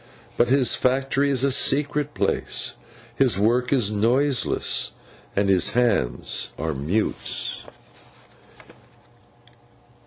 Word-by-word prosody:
But 120 - +2
his 135 -1 +3
factory 135 +2 0
is 135 -2 +2
a 140 - +2
secret 145 +2 +1
place, - - -1 0.4
his 125 -8 +2
work 120 +5 +1
is 120 -7 +2
noiseless, 125 +6 +1 0.4
and 100 0 +1
his 95 -2 +2
Hands 100 - 0
are 80 -1 -3
mutes. 80 +11 -2
125 Hz, 95 wpm, -23 LUFS, 100-135 Hz, 0.4 s, his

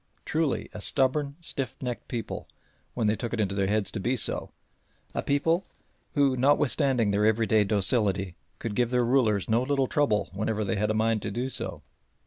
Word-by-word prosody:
Truly 155 -2 0
a 105 - -7
stubborn, 140 +4 +1
stiffnecked 130 -5 -4
people 120 -3 -5 0.5
when 115 - 0
they 105 +1 +3
took 120 +1 -4
it 115 - -2
into 100 -2 0
their 100 -1 0
heads 105 0 0
to 110 - -4
be 120 +7 0
so 120 - -1 0.6
a - - -1
people 165 +6 +1 0.5
who, 140 -3 +3
notwithstanding 135 -3 +2
their 105 +1 +3
everyday 110 -1 +3
docility, 100 -2 +1 0.2
could 115 -3 -4
give 120 +2 +1
their 125 -1 +2
rulers 115 -6 +2
no 115 +2 +2
little 135 +1 +1
trouble 125 -7 +1
whenever 110 +2 -1
they 100 +2 -1
had 105 +1 0
a 110 - +1
mind 110 0 +1
to 105 - -3
do 120 +5 -2
so. 85 - -2
115 Hz, 180 wpm, -27 LUFS, 105-130 Hz, 0.6 s, they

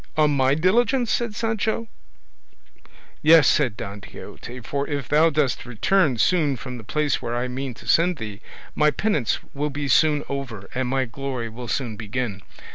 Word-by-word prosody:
"On 150 -1 +4
my 135 0 +3
diligence!" 235 - +2
said 235 -3 -1
Sancho. 225 0 -1 1.3
"Yes," 155 -3 +7
said 125 -8 +2
Don 100 +1 -7
Quixote, 125 +5 -10
"for 140 +4 -3
if 140 -4 -3
thou 155 +2 +4
dost 145 -4 0
return 130 - +1
soon 150 +2 +2
from 125 -1 -7
the - - -10
place 150 +5 0
where 120 - -3
I 120 +1 -1
mean 130 0 -4
to - - -14
send 175 +1 +3
thee, 105 -2 -7 0.3
my 150 0 +4
penance 150 - 0 0.2
will 145 +2 -1
be 145 0 -4
soon 150 +1 +3
over, 125 -8 -5
and 130 0 -1
my 135 0 +1
glory 125 -1 -4
will 120 +2 -8
soon 115 -1 -2
begin. 110 -2 -4
140 Hz, 170 wpm, -23 LUFS, 120-155 Hz, 1.3 s, Yes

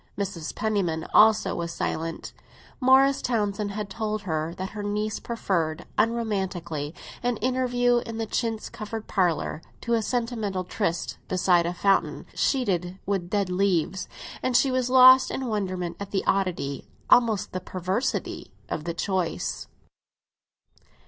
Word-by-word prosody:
Mrs. 195 -5 -4
Penniman 190 -7 0
also 220 0 +5
was 170 -1 -3
silent; 165 -1 -3 0.5
Morris 265 +1 +5
Townsend 210 -3 -1
had 210 0 -3
told 215 +1 -3
her 160 -2 -2
that 190 +1 -4
her 210 - -6
niece 210 +1 -2
preferred, 175 -8 -2
unromantically, 190 -9 -1 0.3
an 245 -1 0
interview 245 0 +2
in 230 -1 -6
a 225 - -1
chintz 225 0 -2
covered 220 -1 -6
parlour 175 -4 0 0.2
to 235 - -1
a 230 - +3
sentimental 220 -5 -2
tryst 180 -2 -2
beside 180 -2 +3
a 175 - -2
fountain 195 +2 +1
sheeted 185 - 0
with 190 -3 -1
dead 200 -2 0
leaves, 185 -1 +1 0.3
and 255 -1 +3
she 270 +1 +3
was 255 -1 0
lost 255 0 +8
in 265 - -3
wonderment 185 -6 -2
at 200 -1 -6
the 195 - -1
oddity—almost 195 - +1
the 185 - -3
perversity—of 185 - -3
the 170 -1 -3
choice. 185 -2 -2
200 Hz, 130 wpm, -26 LUFS, 180-230 Hz, 0.5 s, lost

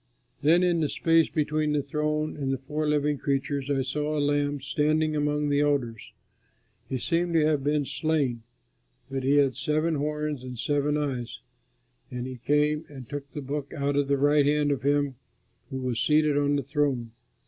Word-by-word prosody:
Then 165 +5 +4
in 175 -2 +2
the 150 -3 0
space 165 -1 +3
between 155 0 0
the 145 -1 +1
throne 150 +2 -1
and 135 -2 -2
the 135 - 0
four 150 +4 -3
living 150 -1 +1
creatures 140 0 -1
I 135 -2 +1
saw 150 +3 -2
a - - +1
Lamb 145 0 +1
standing 155 +3 +1
among 150 0 0
the 145 0 +2
elders. 135 -7 -1 0.8
He 130 - -1
seemed 170 +5 0
to 155 -2 +4
have 150 -3 +1
been 145 0 +1
slain, 140 -3 -1 0.7
but 135 0 -2
he 135 +2 +2
had 135 -4 +3
seven 155 +3 0
horns 150 -2 -2
and 125 -1 -7
seven 145 +3 0
eyes. 125 -6 -3 0.7
And 125 0 -5
he 130 -1 -6
came 150 +4 +1
and 135 -5 -10
took 145 +1 -6
the 150 - -4
book 140 +2 -4
out 140 -1 -1
of 145 -1 +1
the 140 0 +2
right 145 +1 +4
hand 145 0 +2
of 135 -2 -1
him 145 -1 +1 0.5
who 135 - -4
was 125 -3 -2
seated 150 +2 +3
on 145 0 +2
the 140 - -1
throne. 135 -4 -1
145 Hz, 185 wpm, -27 LUFS, 135-150 Hz, 0.8 s, Then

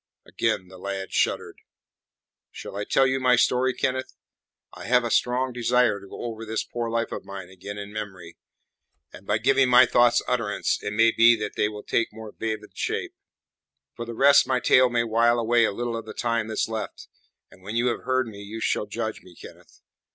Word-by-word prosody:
Again 105 -5 -1
the 95 0 -14
lad 95 0 -5
shuddered. - - -1 0.9
"Shall - - -9
I 100 0 -3
tell 135 - +3
you 130 0 +1
my 125 -1 +4
story, 130 +1 +2
Kenneth? 130 0 -3 0.6
I - - -10
have 125 0 +3
a 120 - -3
strong 125 +2 +1
desire 120 -3 +2
to 100 - -14
go - - -9
over 115 -2 -5
this 110 0 -2
poor 120 -1 -4
life 115 0 -1
of - - -5
mine 95 -2 -9
again 95 +2 -9
in 100 0 -8
memory, 95 -6 -7 0.8
and 100 - -14
by 105 - +2
giving 130 +3 +3
my 125 - +7
thoughts 120 -1 +3
utterance 115 -5 -1
it 105 - -4
may 115 +2 +4
be 115 +1 +6
that 105 - -5
they 105 - +1
will 105 -1 -9
take 115 - 0
more 110 0 -10
vivid 110 -1 -5
shape. - - -3 0.8
For 120 - -6
the 115 - -6
rest 140 +3 +5
my 130 -1 +1
tale 130 +1 +4
may 120 -1 +1
wile 115 +1 +2
away 115 0 +3
a - - 0
little 120 +3 -3
of 115 -1 -6
the 110 - -8
time 115 -2 -1
that's 110 - -1
left, 110 -1 -6 0.4
and - - -18
when 100 +4 -7
you 120 +1 +1
have 120 - -3
heard 130 0 0
me 105 -3 -10
you 105 +2 -7
shall 105 - -1
judge 110 +1 -4
me, 90 -2 -17
Kenneth. - - -15
115 Hz, 205 wpm, -25 LUFS, 105-120 Hz, 0.9 s, my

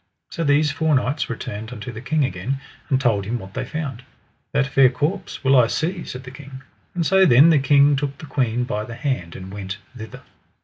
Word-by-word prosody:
So 165 - -3
these 145 0 +3
four 160 0 +1
knights 135 +2 0
returned 110 -1 -6
unto 125 +1 -7
the 110 0 -8
king 140 +3 +1
again, 135 0 -3 0.3
and 130 - +2
told 115 -7 +1
him 115 +5 -2
what 95 -4 -10
they - - -3
found. 140 -6 -5 0.5
That 140 -1 +2
fair 135 -1 +5
corpse 155 +9 -3
will 135 0 +4
I 125 -3 +6
see, 170 +7 -2
said 125 +1 -7
the 125 - -10
king. 135 0 -11 0.3
And 170 -2 0
so 190 +3 +5
then 155 0 +7
the 155 - +4
king 140 +1 +4
took 140 0 -3
the - - -9
queen 125 -4 0
by 105 -3 -3
the 115 +2 -8
hand, 115 - -3
and 95 +1 -9
went 100 -1 -5 0.2
thither. 110 -2 -9
135 Hz, 215 wpm, -22 LUFS, 115-145 Hz, 0.5 s, then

